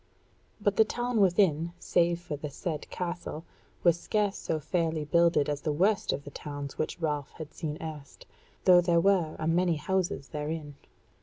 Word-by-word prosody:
But 205 -1 +1
the 220 - +8
town 240 0 -1
within, 170 -3 +3
save 170 -1 +1
for 170 -4 -5
the 150 +1 -5
said 150 +2 -5
castle, 170 -2 -5 0.4
was 170 -1 +4
scarce 205 0 0
so 160 - -2
fairly 160 0 -1
builded 170 -1 +3
as 145 -1 -2
the 155 - -1
worst 190 +7 +2
of 140 - -3
the 145 - -9
towns 145 -1 -6
which 155 - -2
Ralph 150 -4 -1
had 155 -2 -9
seen 155 -3 -4
erst, 155 -3 -8 0.4
though 180 -1 +8
there 170 -1 +3
were 175 -4 +2
a - - -3
many 170 +1 +2
houses 175 -4 -1
therein. 150 0 -4
165 Hz, 170 wpm, -29 LUFS, 150-180 Hz, 0.4 s, the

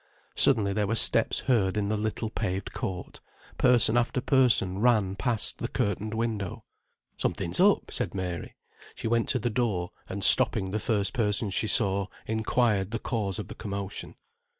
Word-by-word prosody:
Suddenly 105 -7 +2
there 105 0 -1
were 115 - -1
steps - - +2
heard 105 -6 +1
in 100 -1 -1
the 110 - 0
little 110 +1 -3
paved 95 -4 -4
court; 95 -7 -6 0.4
person 120 -2 +4
after 120 +2 0
person 120 -9 +2
ran 105 -5 +2
past 115 +1 -1
the - - -3
curtained 105 +2 -2
window. 110 -5 -3 0.5
"Something's - - -2
up," - - +3
said - - -3
Mary. 90 -3 -5 0.4
She - - -5
went 115 0 0
to 130 - +1
the 120 0 -2
door 105 -7 -1 0.2
and - - -5
stopping 95 0 +6
the 110 - -2
first 105 -3 -1
person 105 -3 +1
she 110 - -1
saw, 100 -4 +2 0.2
inquired 110 -2 0
the 115 - -3
cause 105 -7 -3
of 105 - -6
the 110 - -8
commotion. 100 -3 -6
110 Hz, 165 wpm, -27 LUFS, 100-115 Hz, 0.5 s, stopping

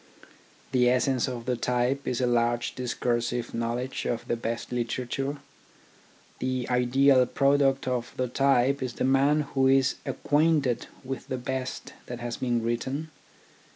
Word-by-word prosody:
The 125 -1 +4
essence 125 +1 +2
of 120 -3 -5
the 125 -1 0
type 125 +3 0
is 125 - -1
a - - +3
large 120 0 +1
discursive 120 -1 -2
knowledge 120 +3 -2
of 115 - -3
the - - 0
best 115 +1 -4
literature. 125 +4 -2 1.0
The 130 -1 -2
ideal 130 +2 +4
pro 140 +2 +3
duct 135 -1 +1
of 125 -2 -2
the 130 - 0
type 135 +1 +2
is 130 -2 -3
the - - -3
man 135 +3 +3
who 135 -1 +3
is 135 0 +3
acquainted 145 -1 +1 0.2
with 135 0 -6
the 130 - -2
best 130 +1 -4
that 120 -1 -6
has 120 -1 -4
been 120 -2 0
written. 130 +7 -2
125 Hz, 150 wpm, -27 LUFS, 120-135 Hz, 1.0 s, The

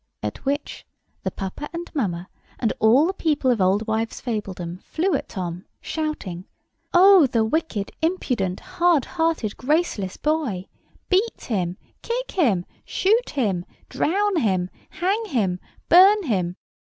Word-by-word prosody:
At - - -4
which 285 +2 -2 0.4
the - - -1
papa 195 +10 -6
and 340 +1 -6
mamma 185 - -2 0.3
and 225 - 0
all 240 +8 +5
the 375 - 0
people 295 -7 +1
of 235 - +1
Oldwivesfabledom 205 -2 -1
flew 360 +3 -1
at 280 - -2
Tom, 180 -1 -5
shouting, 305 - -4 0.5
"Oh, 370 -3 +7
the 230 -3 +1
wicked, 225 -6 -1
impudent, 250 - 0
hard 345 -6 +2
hearted, 325 - -1
graceless 265 - 0
boy! 290 - -1 0.4
Beat 395 +5 +1
him, 185 -5 -2 0.2
kick - - -3
him, 220 - +2 0.2
shoot 445 +6 +1
him, 205 -11 0 0.3
drown 400 +3 +1
him, 190 - +1 0.2
hang 380 +7 0
him, 205 - 0 0.3
burn 390 +4 +7
him!" 185 - -1
260 Hz, 125 wpm, -23 LUFS, -, 0.5 s, Oh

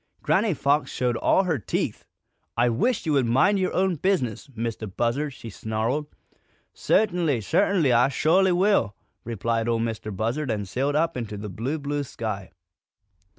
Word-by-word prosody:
Granny 190 +4 +2
Fox 145 +2 +1
showed 125 -2 0
all 190 - +3
her 165 -7 0
teeth. 100 - -3 0.5
"I 120 +1 +4
wish 210 - 0
you 155 - +1
would 135 -4 +2
mind 180 - +3
your 185 - 0
own 185 -2 +1
business, 145 - -1
Mistah 115 -1 -3
Buzzard!" 120 +9 -1
she 115 -3 -10
snarled. 110 +9 -2 0.7
"Cert'nly, 175 - +1
cert'nly, 160 - +2
Ah 120 +1 +5
sho'ly 180 +8 +3
will!" 180 - +2 0.3
replied 115 0 -1
Ol' 115 -1 +2
Mistah 115 -1 -3
Buzzard, 115 +8 -2
and 105 -3 -2
sailed 135 +8 -1
up 165 +2 +1
into 110 -4 -4
the 105 +1 -6
blue, 120 - -3
blue 145 0 -2
sky. 110 -8 -5
130 Hz, 155 wpm, -25 LUFS, 115-165 Hz, 0.7 s, Ah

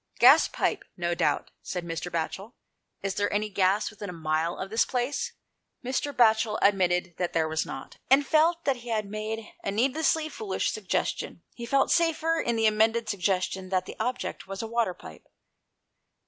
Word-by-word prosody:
" - - -27
Gas - - +8
pipe, 405 -1 -1
no 175 -1 0
doubt," - - 0
said 180 -2 -4
Mr. 170 +1 -4
Batchel. 190 +7 -3 0.5
"Is 195 -1 -1
there 205 +1 0
any 210 +1 0
gas 195 +2 +1
within 205 -2 -8
a - - -6
mile 160 +1 -1
of 190 +1 -6
this 225 - +4
place? 280 - -2 0.2
" - - -27
asked 260 +3 0
Wardle. 285 - -5
Mr. - - -29
Batchel 220 -2 +4
admitted 185 -3 +2
that 180 -1 -2
there 160 -1 +2
was 160 0 -1
not, 135 - -8
and 275 +2 +5
felt 330 +3 +3
that 275 -2 +2
he 240 0 -10
had 215 -2 0
made 215 +2 -5
a - - -2
needlessly 275 +8 +1
foolish 395 +5 -2
suggestion. 435 - -2
He 235 -1 -7
felt 275 +2 +2
safer 330 -1 +2
in 235 - 0
the 225 -1 +2
amended 220 +1 +2
suggestion 190 -1 -1
that 185 -1 0
the - - -8
object 250 -1 -3
was 195 +2 -5
a - - -4
water 230 -5 0
pipe. 80 - -13
215 Hz, 190 wpm, -27 LUFS, 185-255 Hz, 0.5 s, Gas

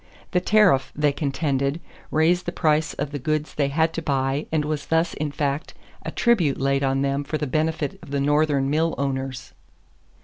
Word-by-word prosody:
The 180 - +2
tariff, 185 -10 +4
they 150 -1 +2
contended, 140 0 -1 0.3
raised 170 +3 +2
the - - 0
price 155 -2 +1
of 145 - -3
the 145 - -4
goods 155 +3 -2
they 145 -2 +1
had 160 +3 +1
to 165 - -3
buy 135 -1 -1
and 155 -2 +1
was 150 -1 -3
thus 165 +1 +1
in 150 0 -3
fact 140 +1 -2 0.3
a - - -4
tribute 190 - +2
laid 140 0 +1
on 135 0 +1
them 140 +1 0
for 155 +2 -3
the 150 - -2
benefit 155 +1 -1
of - - -12
the 140 0 -1
Northern 145 -1 +2
mill 160 +3 +1
owners. 135 -1 -3
145 Hz, 190 wpm, -23 LUFS, 140-160 Hz, 0.3 s, tariff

